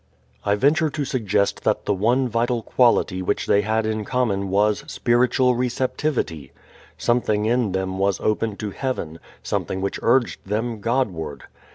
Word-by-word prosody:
I 100 - +2
venture 155 +8 +3
to 145 0 -3
suggest 110 -7 0
that - - 0
the - - +1
one 120 +7 +2
vital 120 0 0
quality 115 -6 +2
which 90 - -1
they 100 - +3
had 110 +2 0
in 110 0 -1
common 105 -5 -1
was 105 +2 +2
spiritual 125 +1 +2
receptivity. 125 - -2 0.5
Something 110 -3 +1
in 115 -3 +1
them 95 0 -2
was 100 -1 +1
open 110 0 0
to 105 -2 -4
heaven, 90 - -4 0.2
something 95 - -2
which 100 +1 -2
urged 120 +1 +2
them 110 +3 -2
Godward. 100 - -2
110 Hz, 150 wpm, -22 LUFS, 100-125 Hz, 0.5 s, venture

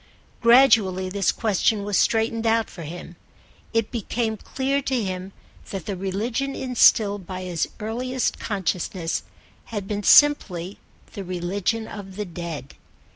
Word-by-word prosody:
Gradually 225 -7 +5
this 195 0 +1
question 215 -1 +1
was 205 0 -2
straightened 225 +2 +2
out 225 0 +2
for 170 - -9
him: 170 +2 -8 0.5
it 225 -2 0
became 225 -1 -2
clear 270 +5 -2
to 260 -4 -1
him 185 0 -4 0.4
that 190 -4 -5
the 200 - -3
religion 225 +9 -2
instilled 210 -6 +3
by 185 -1 -5
his 175 -3 -2
earliest 245 +4 -2
consciousness 180 -3 -2 0.4
had 205 -4 -5
been 205 0 -2
simply 200 - +4 0.3
the 200 - -5
religion 185 +5 -2
of 195 -2 -9
the 210 +1 -3
Dead. 170 -6 -7
205 Hz, 130 wpm, -24 LUFS, 185-230 Hz, 0.5 s, Gradually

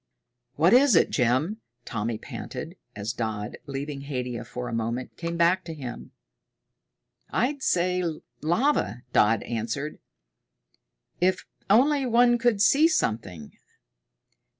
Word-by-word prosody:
"What 165 +7 +4
is 260 -3 +6
it, - - +4
Jim?" 140 - +1 0.2
Tommy 115 0 -3
panted, - - -7 0.2
as 105 +2 -3
Dodd, 110 -3 -4
leaving 140 0 -5
Haidia 125 -4 -4
for 125 0 -6
a 115 - -5
moment, 115 +2 -3
came 170 0 -4
back 175 +3 +3
to 165 -2 -6
him. 130 -5 -7 1.2
"I'd 270 +4 0
say 180 -3 +1 0.4
lava," 170 - +1
Dodd 110 0 +4
answered. 120 +6 -4 1.2
"If 185 +1 +1 0.2
only 270 +5 +4
one 240 0 +4
could 230 -4 +2
see 295 +8 +6
something! 105 - -2
150 Hz, 115 wpm, -26 LUFS, -, 1.2 s, is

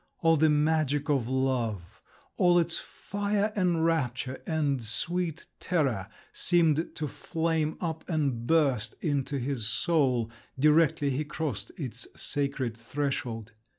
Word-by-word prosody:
All 165 0 +6
the 155 +1 +4
magic 150 -1 +2
of 130 -5 +1
love, 115 -7 -1 0.3
all 175 -2 +4
its 170 -1 +2
fire 205 +1 -2
and 175 -5 +2
rapture 130 -5 -1
and 145 -5 +1
sweet 170 +9 -1
terror, 135 - 0 0.3
seemed 165 -2 +2
to 155 - -2
flame 160 +1 -1
up 160 -1 -4
and 140 -8 0
burst 135 -9 +2
into 145 -3 0
his 125 -4 -2
soul, 130 -4 +1 0.3
directly 150 0 +4
he 135 +4 0
crossed 150 -6 -4
its 125 -5 -6
sacred 140 -5 -1
threshold…. 120 -2 -3
145 Hz, 120 wpm, -29 LUFS, 130-165 Hz, 0.3 s, All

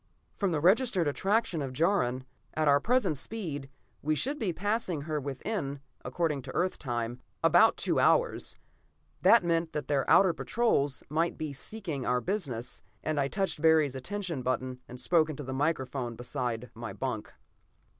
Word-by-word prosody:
From 200 -3 0
the 155 - +1
registered 190 - +3
attraction 195 +2 +1
of 135 -2 -4
Jaron, 130 -5 +1 0.3
at 155 -1 +1
our 140 0 +6
present 215 - +1
speed, 150 -10 -5 0.3
we 155 +1 +1
should 280 - -1
be 205 -6 0
passing 195 -3 -1
her 155 0 -2
within, 140 - -3 0.2
according 160 -5 -1
to 130 0 -8
Earth 185 +1 0
time, 120 -2 -3 0.2
about - - +6
two - - 0
hours. - - +3 0.7
That 230 -4 +6
meant 165 -1 0
that 150 -3 -3
their 140 -3 0
outer 190 -3 +6
patrols 145 - 0
might 165 +3 0
be 155 -3 -4
seeking 160 -1 -5
our 125 0 +1
business, 140 - -3 0.2
and 155 -1 0
I 135 - +2
touched 190 -1 -1
Barry's 160 -4 +4
attention 170 +2 -4
button, 130 0 -2
and 125 - -9
spoke 160 +4 +3
into 145 -1 -5
the 130 0 -5
microphone 130 -4 -1
beside 120 -1 -4
my 115 0 -6
bunk. 125 -5 -4
150 Hz, 160 wpm, -30 LUFS, 130-185 Hz, 0.7 s, our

